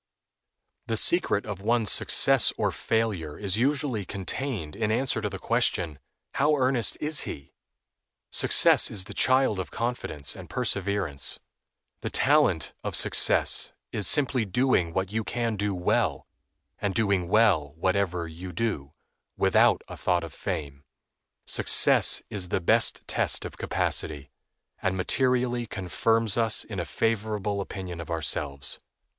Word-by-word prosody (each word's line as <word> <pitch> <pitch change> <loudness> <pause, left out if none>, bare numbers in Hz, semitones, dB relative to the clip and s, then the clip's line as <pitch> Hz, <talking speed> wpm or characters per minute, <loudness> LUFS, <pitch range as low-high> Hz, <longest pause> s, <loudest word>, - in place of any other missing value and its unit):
The 115 - -1
secret 140 - +1
of 100 -3 -6
one's 115 0 +2
success - - +5
or - - 0
failure 105 -9 -2
is 100 -1 -2
usually 130 -3 0
contained 100 - -5
in 105 0 -1
answer 120 -1 -1
to 105 - -2
the 95 - -7
question, 85 -3 -1 0.3
"How 150 +2 +2
earnest 130 -4 0
is 150 -1 -1
he?" 70 -1 -9 0.8
Success - - +5
is 100 -3 -1
the - - -10
child 130 -6 +2
of 95 - -5
confidence 115 -12 -3
and 90 -3 -11
perseverance. 100 - 0 0.6
The - - -5
talent - - +2
of - - -2
success - - +3 0.2
is 105 - -1
simply 135 -4 +3
doing 100 -4 +1
what 95 +2 -2
you 110 +1 -2
can 115 0 -2
do 100 -1 -2
well, 90 - 0 0.5
and 100 -2 -2
doing 100 -5 +1
well 95 -9 +2
whatever 90 -1 -1
you 85 +3 -9
do, 80 -8 -3 0.4
without - - +3
a - - -8
thought - - 0
of - - -8
fame. 70 -2 -5 0.6
Success - - +4
is 95 -3 -2
the - - 0
best 85 - +1
test - - 0
of - - -8
capacity, 75 -2 -2 0.5
and 95 0 -1
materially 125 +3 0
confirms 110 +4 0
us 115 -1 +1
in 100 -4 -7
a 85 - -3
favorable 105 +1 -2
opinion 90 -3 -7
of 85 - -10
ourselves. 75 -4 -1
100 Hz, 140 wpm, -26 LUFS, 90-115 Hz, 0.8 s, success